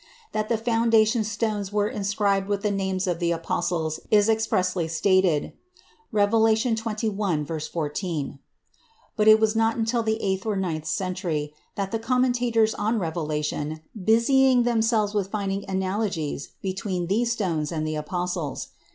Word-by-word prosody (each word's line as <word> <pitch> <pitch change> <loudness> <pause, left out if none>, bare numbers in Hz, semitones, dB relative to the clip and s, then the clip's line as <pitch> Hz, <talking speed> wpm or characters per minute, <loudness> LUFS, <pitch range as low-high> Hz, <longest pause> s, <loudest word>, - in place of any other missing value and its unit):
That 215 0 -2
the 230 - +2
foundation 225 0 +3
stones 210 -2 -2
were 205 0 +1
inscribed 200 -1 0
with 205 0 -1
the 210 - +1
names 190 -1 -1
of 175 -2 -1
the 170 -1 +1
apostles 165 -1 -1
is 210 0 +4
expressly 185 -6 +1
stated 180 -1 +2 0.6
(Rev. 205 -2 +2
xxi, 220 - 0
14), 150 -3 -3 0.8
but 215 -1 +2
it 215 0 +8
was 220 0 +2
not 225 +1 +2
until 230 +1 +1
the 220 0 -1
eighth 190 -2 -1
or 215 -2 -1
ninth 165 -5 -2
century 170 -4 -2 0.2
that 195 -1 -3
the 225 - -1
commentators 245 -2 +2
on 215 +3 0
Revelation 155 -3 -2
busied 240 +4 +4
themselves 225 -3 +2
with 200 -2 -1
finding 200 -1 -3
analogies 190 -6 -2
between 190 -2 -2
these 225 +6 +1
stones 170 -9 -1
and 155 -2 -2
the 155 0 -2
apostles. 175 -1 -3
200 Hz, 140 wpm, -25 LUFS, 175-220 Hz, 0.8 s, it